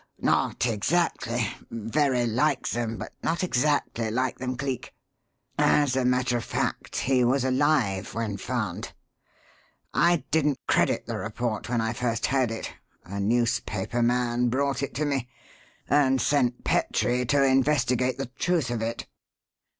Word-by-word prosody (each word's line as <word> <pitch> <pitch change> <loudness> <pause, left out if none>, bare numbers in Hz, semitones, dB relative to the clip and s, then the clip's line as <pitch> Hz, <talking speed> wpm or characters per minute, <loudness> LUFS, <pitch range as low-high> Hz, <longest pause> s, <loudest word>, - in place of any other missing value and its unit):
"Not - - +1
exactly 120 - 0 0.2
very 120 +3 0
like 125 +4 +1
them, 115 -2 -2
but - - -7
not 170 +2 -1
exactly 135 -7 0
like 125 +3 -1
them, 130 -1 -3
Cleek. 135 -2 -4 0.6
As 145 -4 +3
a 130 - +1
matter 125 -1 +2
of 115 - -4
fact, - - -3
he 130 -1 +2
was 130 +2 +2
alive 130 -9 +1
when 110 -3 -2
found. 110 -5 -3 1.0
I 170 +1 +3
didn't 150 -3 +2
credit - - +2
the - - -4
report 115 +1 -3
when 120 -2 +1
I 110 0 -1
first 115 -1 -1
heard 130 -3 +1
it 115 0 -5 0.3
(a 100 +3 -5
newspaper 120 0 0
man 120 0 +1
brought 135 +1 0
it 140 -3 -4
to 150 +4 0
me), 135 -4 -1 0.6
and 135 -1 +3
sent 125 -4 +1
Petrie 125 +1 +1
to 140 +1 +3
investigate 130 -2 +2
the 135 - -2
truth 170 -8 +1
of 120 -2 -2
it." 115 +1 -3
125 Hz, 140 wpm, -26 LUFS, 115-135 Hz, 1.0 s, As